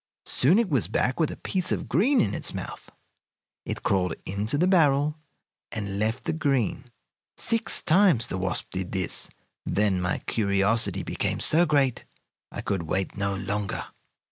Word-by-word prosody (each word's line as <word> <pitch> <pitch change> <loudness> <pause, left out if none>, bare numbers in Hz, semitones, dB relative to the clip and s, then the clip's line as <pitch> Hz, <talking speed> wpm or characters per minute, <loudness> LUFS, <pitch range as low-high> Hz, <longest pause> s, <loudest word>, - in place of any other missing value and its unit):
Soon 155 +10 +3
it 230 -2 +2
was 135 - +1
back 125 - 0
with 160 - +2
a - - -7
piece 185 -2 -2
of - - -2
green 260 +9 +3
in 100 - 0
its - - -3
mouth. - - -7 0.8
It - - -4
crawled 90 -3 +1
into 105 +7 -1
the 175 - +3
barrel 150 -5 +3 0.6
and 100 -2 -4
left 110 +4 -1
the - - -1
green. 135 - 0 0.5
Six 230 -1 +2
times 170 - +4
the 95 - -4
wasp 95 0 -1
did 95 -1 -4
this; 95 -2 -1 0.3
then 100 -3 +1
my 90 0 0
curiosity 105 +1 +1
became - - -2
so 170 +3 +4
great 140 -5 +1 0.5
I - - -5
could 95 -3 -2
wait 95 0 -1
no 100 0 -1
longer. 100 +1 -3
110 Hz, 160 wpm, -26 LUFS, 100-155 Hz, 0.8 s, times